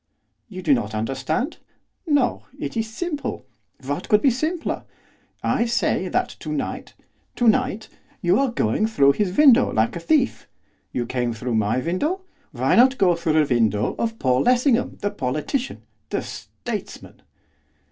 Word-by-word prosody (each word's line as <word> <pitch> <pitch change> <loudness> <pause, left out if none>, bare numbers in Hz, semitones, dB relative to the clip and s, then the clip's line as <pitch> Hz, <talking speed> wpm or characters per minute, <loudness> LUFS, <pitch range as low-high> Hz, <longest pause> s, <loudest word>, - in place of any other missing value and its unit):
'You 185 -3 -8
do 155 -5 +4
not 110 -4 -1
understand? 135 - -2 0.5
no! 285 -5 +1
it - - -5
is 225 -1 -1
simple! 295 - -4 0.4
what 145 +2 -4
could 210 - +4
be 275 - +5
simpler? 310 +7 -2 0.6
I 235 - +1
say 240 +2 0
that - - 0
to - - -6
night - - -4 0.4
to 240 - +1
night! 225 -2 +2 0.3
you 180 +6 +2
are 275 -1 +2
going 215 - 0
through 140 -11 +4
his 190 +3 -1
window 265 -4 +6
like 110 +1 +1
a - - -3
thief. 265 - +1 0.4
You 120 - -2
came 120 -1 -1
through 120 +2 -4
my 110 +1 +1
window, 185 - -1 0.3
why - - +1
not 255 +2 +6
through 180 -8 +3
the 155 -3 +2
window 110 -3 +1
of 225 -1 -1
Paul 130 - +2
Lessingham, 250 0 +2
the 205 - -1
politician 205 - -3 0.3
the - - -2
statesman. - - -7
205 Hz, 150 wpm, -23 LUFS, -, 0.6 s, window